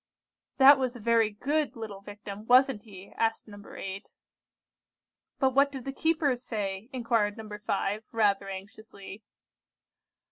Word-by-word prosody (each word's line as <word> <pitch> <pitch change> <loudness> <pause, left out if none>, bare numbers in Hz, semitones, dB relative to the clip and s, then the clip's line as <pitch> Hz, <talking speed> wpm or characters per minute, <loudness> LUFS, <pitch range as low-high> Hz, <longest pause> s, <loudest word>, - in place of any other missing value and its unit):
'" - - -65
"That 275 +1 +8
was 255 -1 -1
a - - -8
very 230 0 +3
good 290 +8 -1
little 215 -4 -7
Victim, 205 +1 -9
wasn't 255 -2 +5
he?" 200 -3 -13
asked 225 0 0
No. 205 -1 -12
8. 195 +2 -7 1.3
"But 265 -2 +2
what 280 +1 +4
did 265 -3 -8
the 270 - -4
keepers 295 -5 +1
say?" 210 -2 -4
inquired 230 -5 0
No. 220 -1 -8 0.2
5, 205 +2 -2
rather 200 -3 +1
anxiously. 200 +1 -10
220 Hz, 140 wpm, -28 LUFS, 205-255 Hz, 1.3 s, That